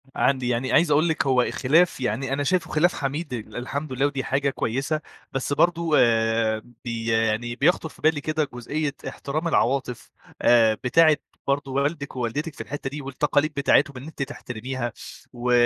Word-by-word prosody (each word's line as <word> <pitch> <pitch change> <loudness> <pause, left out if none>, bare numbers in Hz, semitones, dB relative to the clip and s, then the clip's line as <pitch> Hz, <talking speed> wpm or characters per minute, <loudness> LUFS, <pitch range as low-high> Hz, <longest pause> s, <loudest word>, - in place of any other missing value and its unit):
عندي 130 -3 +1
يعني 125 +2 -1
عايز 165 -1 +4
أقول 155 +3 +4
لِك 155 -3 0
هو 130 -2 +4
الخلاف 150 +8 +2
يعني 130 +2 -1
أنا 145 +1 0
شايفه 175 +1 0
خلاف 175 +4 +3
حميد، 145 +1 -3
الحمد 130 +5 -5
لله 135 +2 +1
ودي 140 -2 -1
حاجة 140 +1 0
كويسة، 135 +5 -2 0.3
بس 135 +1 -2
برضه 170 +2 +2
آآ 115 -1 +2 0.2
بي 115 -1 -3
يعني 115 +1 +1
بيخطُر 160 +4 +2
في - - -18
بالي 155 -1 +2
كده 155 0 -1
جزئية 140 +4 -3
احترام 155 +4 -3
العواطف، 130 -5 0 0.3
آآ 115 -2 +5
بتاعة 155 +4 +5 0.3
برضه 140 0 0
والدِك 140 +1 -2
ووالدتِك 135 +6 -3
في - - -7
الحتّة 140 -1 -5
دي، 145 +2 -6
والتقاليد 145 +2 0
بتاعتهم 140 -1 +2
إن 125 - -8
أنتِ 155 -1 -8
تحترميها، 125 -1 -5 0.4
و 125 0 -2
140 Hz, 165 wpm, -24 LUFS, 125-150 Hz, 0.4 s, آآ